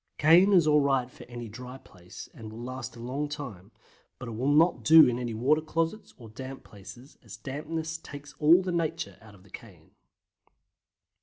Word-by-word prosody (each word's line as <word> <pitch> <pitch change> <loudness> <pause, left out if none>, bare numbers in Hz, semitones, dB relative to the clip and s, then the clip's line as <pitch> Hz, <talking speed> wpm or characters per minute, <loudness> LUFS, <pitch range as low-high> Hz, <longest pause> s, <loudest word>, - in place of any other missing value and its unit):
Cayenne 175 +6 +5
is 175 -4 +5
alright 140 -4 +2
for 120 - -13
any 120 -1 -8
dry 125 +4 -9
place 90 -5 -13
and 110 -2 -10
will 115 +2 -9
last 130 -2 -7
a - - -12
long 135 +5 -4
time, 125 - -8 0.5
but 125 - -9
it - - -6
will 125 +6 -1
not 165 +4 +3
do 160 0 +8
in 120 0 -1
any 120 -3 -4
water 140 +7 +2
closets 165 +6 -3
or 120 - -13
any - - -19
damp 130 +2 -8
places, 120 +7 -14
as 105 -5 -11
dampness 160 +6 -5
takes 145 -2 -11
all 165 +5 +5
the 185 - -3
nature 165 -1 -3
out 105 -2 -16
of 95 - -20
the 100 - -21
cayenne. - - -13
135 Hz, 190 wpm, -28 LUFS, 115-155 Hz, 0.5 s, do